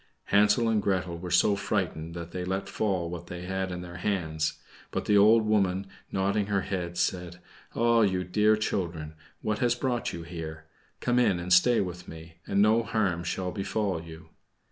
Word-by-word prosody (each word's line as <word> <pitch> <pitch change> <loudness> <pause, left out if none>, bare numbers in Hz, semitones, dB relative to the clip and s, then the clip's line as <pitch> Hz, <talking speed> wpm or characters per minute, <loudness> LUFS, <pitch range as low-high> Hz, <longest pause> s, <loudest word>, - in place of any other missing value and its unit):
Hansel 105 +3 +5
and 110 -2 +2
Gretel 90 -4 -1
were 90 +1 -6
so 90 +4 +4
frightened 90 -5 -2
that 85 -1 -7
they 90 0 -4
let 95 +2 -2
fall 95 -5 -1
what 85 0 -7
they 90 0 -7
had 95 0 -2
in 90 0 -4
their 90 0 -8
hands; 80 -5 -1 0.4
but - - -3
the 105 - +3
old 110 +2 +6
woman, 100 -3 +1 0.3
nodding 100 +1 0
her 100 -2 +1
head, 90 -3 -4
said, 90 -1 -1 0.4
"Ah, 115 0 +4
you 95 -3 +2
dear 105 +4 +3
children, 85 -7 -2 0.3
what 105 -1 -1
has 120 -1 +2
brought 125 -1 -1
you 85 - -6
here? 80 -2 -7 0.4
Come 125 0 +2
in 100 -8 +3
and 90 +1 0
stay 115 +7 +5
with 90 -2 -5
me, 80 0 -11
and 100 +1 +3
no 110 +2 +4
harm 100 -7 0
shall 90 +1 -2
befall 100 -3 -2
you." 80 -1 -12
95 Hz, 185 wpm, -28 LUFS, 85-105 Hz, 0.4 s, old